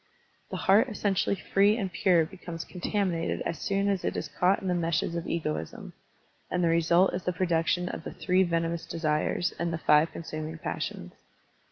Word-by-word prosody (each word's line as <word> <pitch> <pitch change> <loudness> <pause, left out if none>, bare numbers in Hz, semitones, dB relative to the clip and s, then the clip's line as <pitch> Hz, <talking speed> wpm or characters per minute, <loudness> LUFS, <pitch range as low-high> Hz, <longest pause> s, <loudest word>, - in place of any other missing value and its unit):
The - - -4
heart 205 +7 +4
essen 205 -2 0
tially 195 0 0
free 200 +3 +3
and 195 -5 -3
pure 175 -4 +3
becomes 170 -2 -8
contaminated 180 -2 -1
as 170 - -3
soon 200 -2 0
as 195 -3 0
it - - -1
is - - -4
caught 185 +2 +2
in 190 - -5
the 180 - +2
meshes 170 -1 0
of 170 0 -4
egoism, 80 - -4 0.6
and 180 0 0
the 170 - +3
result 170 +3 +3
is - - -2
the 180 - +1
production 175 0 +1
of 165 - -5
the - - -6
three 185 0 +2
venomous 165 -1 0
desires* 160 +2 0
and 170 0 -1
the 165 - -2
five 150 0 +4
consuming 155 -1 -6
pas - - -4
sions.' - - -5
170 Hz, 190 wpm, -28 LUFS, 165-190 Hz, 0.6 s, heart